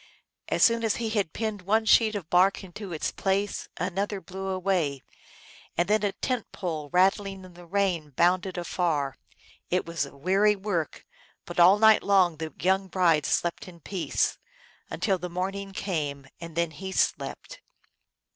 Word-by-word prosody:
As - - +2
soon 230 0 +4
as 225 - +1
he 225 -2 -3
had 205 -7 0
pinned 215 -3 -3
one 220 +4 +1
sheet 220 0 +5
of 190 -6 -5
bark 185 +4 +3
into 190 +1 -8
its 160 - -2
place 195 +1 -1
another 195 +3 -2
blew 190 +1 -7
away, 185 -7 -1 0.7
and 175 - +2
then 210 +1 +3
a 205 -1 +1
tent 250 +2 -3
pole 155 -6 -4
rattling 195 +1 +2
in 180 - -14
the 175 0 -14
rain 180 -5 0
bounded 180 +6 +1
afar. 165 -6 -1 0.5
It 180 +1 0
was 170 -3 -2
a 140 - -15
weary 195 +7 +3
work, 190 -5 -3 0.4
but - - -5
all 180 +4 +7
night 220 0 +6
long 185 -5 +3
the 160 0 -5
young 190 +2 +1
bride 170 -6 +2
slept 175 +2 -1
in 175 -2 -12
peace, 180 +2 -1 0.5
until 195 -4 0
the 180 +1 -5
morning 195 +3 -3
came, 150 -8 -3
and 165 -1 -9
then 170 -1 +1
he 190 +5 -7
slept. - - -2
185 Hz, 165 wpm, -27 LUFS, 170-200 Hz, 0.7 s, all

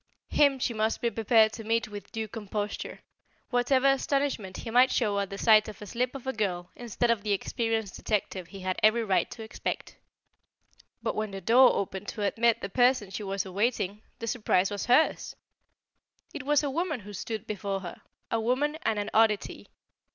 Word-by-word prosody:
Him 280 -2 +4
she 250 -2 -1
must 220 0 0
be 235 - 0
prepared 220 0 +4
to 225 - -7
meet 230 +1 0
with 205 -1 -8
a - - -25
due 220 -1 -4
composure, 210 -1 -5 0.5
whatever 255 +2 +2
astonishment 275 -7 +1
he 225 - -6
might 250 +2 +6
show 205 -4 +1
at 200 -1 -2
the 195 - -6
sight 215 0 +5
of 215 - -9
a 210 - -8
slip 245 +6 -2
of 270 - -8
a 265 - -1
girl 180 -5 -2
instead 240 0 0
of 230 -3 0
the 210 -1 0
experienced 225 0 -2
detective 195 -4 -2
he 195 0 -10
had 185 0 -2
every 225 +2 +4
right 195 -4 +1
to 225 - -8
expect. 220 - -5 1.1
But - - 0
when 215 0 -2
the 195 0 -6
door 245 +7 +6
opened 195 +1 -3
to 210 - -4
admit 230 +3 +2
the - - -3
person 245 -2 +2
she 195 - -5
was 195 0 -2
awaiting, 205 +1 -1 0.2
the 230 - -5
surprise 210 -5 +1
was 205 +3 -4
hers. 255 +6 +2 1.0
It 270 - -7
was 295 0 +3
a 285 - -1
woman 315 -4 -2
who 205 +1 -10
stood 220 +2 -5
before 200 -2 -3
her, 175 -2 -8 0.3
a 230 - +1
woman 285 +7 0
and 220 - 0
an 205 0 -3
oddity. 220 -2 +2
220 Hz, 195 wpm, -28 LUFS, 200-245 Hz, 1.1 s, might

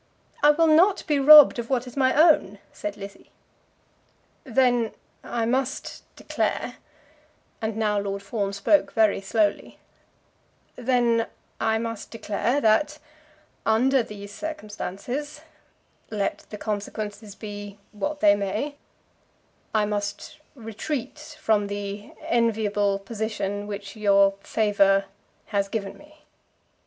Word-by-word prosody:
"I 295 - +6
will 315 +3 +4
not 340 +5 +4
be 295 -2 +1
robbed 295 -2 +9
of 235 - -5
what 255 -2 0
is 250 - -11
my 260 -2 +3
own," 305 - +4 0.2
said 205 0 -5
Lizzie. 200 0 -11 1.2
"Then 245 -2 +2 0.3
I 230 -1 -2
must 260 +3 -2
declare - - -2 0.4
" - - -37
and 220 -1 -3
now 210 -2 +1
Lord 200 0 -4
Fawn 200 -1 -2
spoke 200 +10 +2
very 220 -3 +3
slowly 205 +1 0 1.0
"then 240 -2 +1 0.3
I 220 0 +1
must 230 -1 -5
declare 230 +4 -1
that 285 +7 +2 0.7
under 255 +4 +3
these 205 -2 -9
circumstances, 275 - -6 0.7
let 210 -2 -3
the 210 - -7
consequences 210 0 -5
be 205 -2 -8
what 295 +8 -4
they 205 -1 +6
may, 210 +9 -3 0.9
I 215 -1 +2
must 205 +3 -4 0.2
retreat 230 +3 -6
from 210 -2 +1
the 205 0 -6
enviable 210 -4 +1
position 205 -1 -4
which 200 -1 -7
your 200 -2 +4
favour 200 -3 +2 0.5
has 200 -1 +1
given 200 -1 -4
me." 305 +1 -19
220 Hz, 115 wpm, -25 LUFS, 205-250 Hz, 1.2 s, robbed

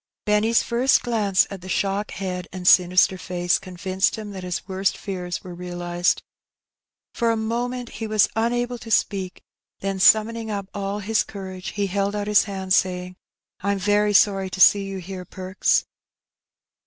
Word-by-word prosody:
Benny's 210 +2 +3
first 245 +3 +2
glance 210 -6 +2
at 195 -2 -7
the 185 - -10
shock 195 +2 -1
head 180 -2 -5
and 180 -1 -5
sinister 185 +1 +5
face 175 -1 0
convinced 185 +2 -1
him 215 -2 -7
that 190 -2 -7
his 180 0 -4
worst 190 0 -1
fears 180 -3 -5
were 180 - -8
realized. 175 0 -1 0.9
For 235 - 0
a 225 - +1
moment 240 +2 -3
he 225 0 -6
was 215 -1 +3
unable 240 +2 -1
to 230 - -10
speak, 195 -3 0 0.4
then 195 -1 -2
summoning 220 +3 +4
up 200 -2 -4
all 200 +1 -3
his 220 +2 +1
courage, 190 -2 -7
he 205 -1 -1
held 200 +1 -1
out 205 -1 -2
his 210 0 +4
hand, 190 -2 -2
saying, 180 0 0 0.2
" - - -68
I'm 200 +1 0
very 205 +1 +2
sorry 195 -1 +3
to 190 - -7
see 200 +1 +6
you 195 0 -5
here. 185 0 -7
Perks." 185 +1 0
195 Hz, 165 wpm, -23 LUFS, 185-215 Hz, 0.9 s, see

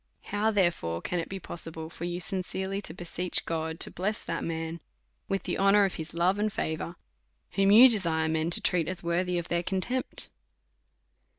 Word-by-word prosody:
How 210 +2 +2
therefore 175 - +1
can 175 - -2
it 165 - -4
be 195 - -5
possi 165 -2 -3
ble 160 0 -7
for 170 - -6
you 175 0 -3
sincerely 190 +1 -2
to - - -5
beseech 175 0 +1
God 160 0 -3
to - - +1
bless 210 +5 -2
that - - -3
man 165 0 -4 0.5
with 195 0 -1
the - - -2
honour 195 +1 +5
of 195 - -2
his 160 -1 -6
love 180 +4 +2
and 215 0 +1
favour, 160 -1 -3 0.6
whom 195 0 +2
you 230 +6 +10
de 230 -4 +3
sire 160 -3 0
men 160 +1 0
to 175 - +3
treat 170 -3 +1
as 185 0 0
worthy 175 +1 0
of 170 - -4
their 170 0 +1
contempt? 195 +8 -2
175 Hz, 195 wpm, -28 LUFS, 165-195 Hz, 0.6 s, you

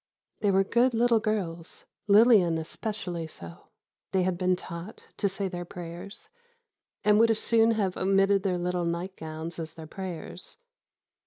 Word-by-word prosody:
They 205 - +1
were 195 0 +4
good 240 +4 +2
little 235 0 +4
girls—Lillian 200 0 +2
especially 175 0 -4
so. 85 - -11 0.5
They 190 -1 +3
had 185 0 0
been 185 +1 +1
taught 175 +3 -9
to 200 - +1
say 195 +1 -3
their 175 -1 -5
prayers, 175 - -8 0.7
and 210 0 +5
would 230 0 +5
as 225 - +3
soon 225 0 +3
have 190 -4 0
omitted 195 +1 +3
their 185 -2 0
little 175 0 -1
nightgowns 170 -2 -5
as 160 -1 -6
their 160 -1 -9
prayers. 180 - -7
185 Hz, 145 wpm, -28 LUFS, 170-210 Hz, 0.7 s, and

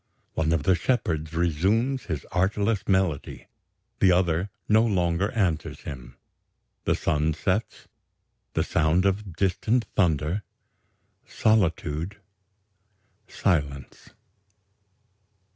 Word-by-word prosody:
One 80 0 0
of 85 -3 +1
the 95 - +4
shepherds 85 -6 -1
resumes 100 - +1
his 80 -5 -4
artless 100 +4 0
melody, 95 -7 0 0.5
the 95 - +5
other 90 +1 +1 0.2
no 110 +1 +5
longer 95 -3 +1
answers 90 -8 -1
him. 65 -4 -9 0.7
The - - +2
sun 75 +1 0
sets... 95 +7 -2 0.7
the - - +1
sound 85 +4 +2
of 100 -2 -1
distant 100 +6 +1
thunder... 85 0 +1 0.9
solitude... 95 -3 0 1.1
silence.... 70 -8 -2
90 Hz, 95 wpm, -26 LUFS, 80-100 Hz, 1.1 s, the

